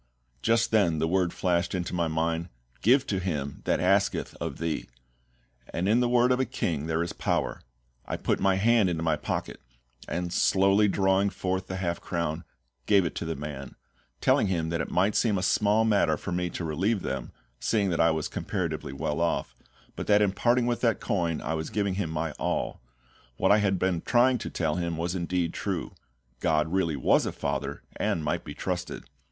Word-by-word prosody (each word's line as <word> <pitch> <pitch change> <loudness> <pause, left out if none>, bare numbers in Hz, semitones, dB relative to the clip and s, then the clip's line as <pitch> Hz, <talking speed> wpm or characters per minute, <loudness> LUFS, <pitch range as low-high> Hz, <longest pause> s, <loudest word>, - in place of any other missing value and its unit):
Just 115 0 +2
then 100 -8 +3
the 80 +1 +1
word 90 0 +1
flashed 85 0 0
into 90 -1 -3
my 85 -2 +1
mind, 80 +2 -1 0.3
"Give 130 +5 +4
to 100 -7 -1
him 75 -7 -3
that - - +2
asketh - - +1
of - - -3
thee," 85 -6 -3 0.8
and 90 +3 -1
in 110 +4 +4
the 125 -1 +2
word 125 +1 +4
of 125 - +2
a 130 - +2
KING 80 - -2
there 80 +1 0
is 85 - -4
power. - - -1 0.5
I - - -2
put - - 0
my 95 -1 +3
hand 110 0 +4
into 80 -2 -2
my 80 -2 +2
pocket, - - -4 0.5
and 85 0 -3
slowly 100 +3 +4
drawing 95 0 +2
forth 95 -1 -3
the 95 - -4
half 85 -2 -2
crown, 85 -1 -2 0.4
gave 100 -3 +5
it 85 - -2
to - - -3
the 80 0 -2
man, 70 -2 -7 0.5
telling 105 - +3
him 85 -4 -1
that 85 -1 -1
it 70 - -4
might 95 +4 +2
seem 105 -2 +2
a 90 - -2
small 105 +3 +3
matter 100 -8 +3
for 90 - -6
me 90 0 -1
to 85 - -5
relieve 95 +7 0
them, 65 -3 -4 0.3
seeing 100 -4 +1
that 85 - +1
I 85 - +5
was 80 -1 -1
comparatively - - -3
well 75 +3 -2
off, 85 -7 -1 0.4
but - - -5
that 105 -1 +5
in 100 - +2
parting 120 +4 +2
with 120 -1 -1
that 115 -3 +2
coin 85 -4 -1
I 80 - -2
was 80 0 -3
giving 100 -2 0
him 95 -3 -2
my 80 0 -2
all; - - -2 0.6
what 95 - +3
I 105 - +6
had 100 -2 +1
been 90 -2 0
trying 125 0 +3
to - - -5
tell 80 -1 -1
him 85 -2 -2
was 85 +2 -2
indeed 90 -1 -1
true - - -3 0.5
GOD 80 0 +1
really 85 -5 +1
was 65 - +3
a - - -1
FATHER, 70 0 -3
and 80 - 0
might 75 - -1
be - - -8
trusted. - - -4
90 Hz, 200 wpm, -27 LUFS, 80-100 Hz, 0.8 s, I